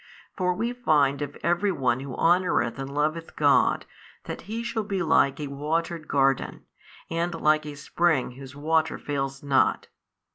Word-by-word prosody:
For 180 -2 0
we 235 +5 -2
find 150 - +2
of 145 -1 -5
every 175 +4 +2
one 130 -7 0
who 135 -1 -6
honoureth 170 -9 +2
and 135 0 -5
loveth 155 +3 -2
God 145 -2 +3 0.4
that - - -6
he 230 +2 -3
shall 235 -1 -2
be 200 -3 -2
like 155 -4 +3
a 150 - -3
watered 155 +4 -3
garden, 135 -2 +1 0.5
and 170 +1 -1
like 155 -1 +2
a 145 - -6
spring 150 -1 0
whose 135 +1 -11
water 160 +2 +1
fails 135 -1 -4
not. 140 -2 +2
155 Hz, 155 wpm, -26 LUFS, 140-175 Hz, 0.5 s, God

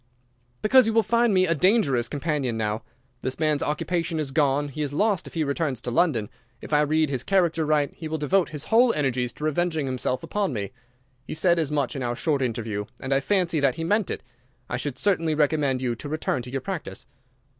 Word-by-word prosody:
"Because 250 +3 +6
you 225 - +1
will 225 0 +4
find 235 +2 +2
me 185 -1 +4
a 165 - +2
dangerous 155 - +2
companion 140 -4 -2
now. 110 0 -1 0.4
This 130 - -3
man's 155 -2 +1
occupation 165 +2 -1
is 145 -3 -3
gone. 145 0 +1
He 145 +2 -6
is 145 -1 -2
lost 205 +2 +1
if - - -12
he 160 - +1
returns 140 -3 -1
to 120 - -4
London. 135 -8 +2 0.3
If - - -8
I 150 - +5
read 155 0 +2
his 130 -3 -1
character 170 -3 +1
right 150 -2 +1
he 160 - -7
will 160 +1 -2
devote 165 +5 +1
his 150 -2 -5
whole 235 +2 +4
energies 125 -4 0
to - - -10
revenging 155 0 0
himself 130 0 -2
upon 200 -8 -1
me. 100 -2 -4 0.6
He - - -4
said 170 +1 +3
as 155 -4 0
much 145 -1 -1
in 135 - -4
our 120 -1 -1
short 145 +1 0
interview, 110 -4 -2
and 130 +1 -2
I 135 - +3
fancy 170 +2 +1
that 140 -2 +2
he 165 - -4
meant 205 +4 +1
it. - - -4 0.4
I - - -3
should 130 +1 -4
certainly 165 -3 +1
recommend 145 -3 +1
you 120 -2 0
to 130 +5 -7
return 155 -4 -1
to 125 - -8
your 135 +1 -3
practice." 185 +2 -5
150 Hz, 220 wpm, -25 LUFS, 130-170 Hz, 0.6 s, Because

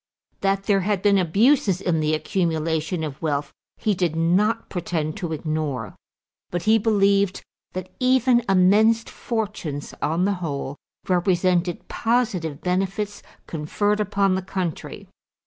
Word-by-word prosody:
That 195 0 +1
there 200 -1 +2
had 195 0 -1
been 200 -1 +4
abuses 195 - +3
in 175 -4 0
the 155 0 +1
accumulation 160 -1 -1
of 150 -3 -6
wealth 145 -3 -2 0.2
he 215 - +1
did 175 -4 0
not 195 +8 +2
pretend 165 -3 -3
to 175 -5 -4
ignore, 155 - -3 0.5
but 175 -1 -3
he 220 +1 +4
believed 200 -3 +2 0.3
that 185 0 -6
even 255 -1 +3
immense 210 +5 +4
fortunes, 210 - -4
on 165 +5 +1
the 200 - +2
whole, 140 -4 -3 0.3
represented 180 -1 +1
positive 210 - -1
benefits 195 +3 -2 0.2
conferred 205 +7 -1
upon 200 -2 +1
the 190 - 0
country. 185 -3 -5
185 Hz, 130 wpm, -23 LUFS, 160-205 Hz, 0.5 s, been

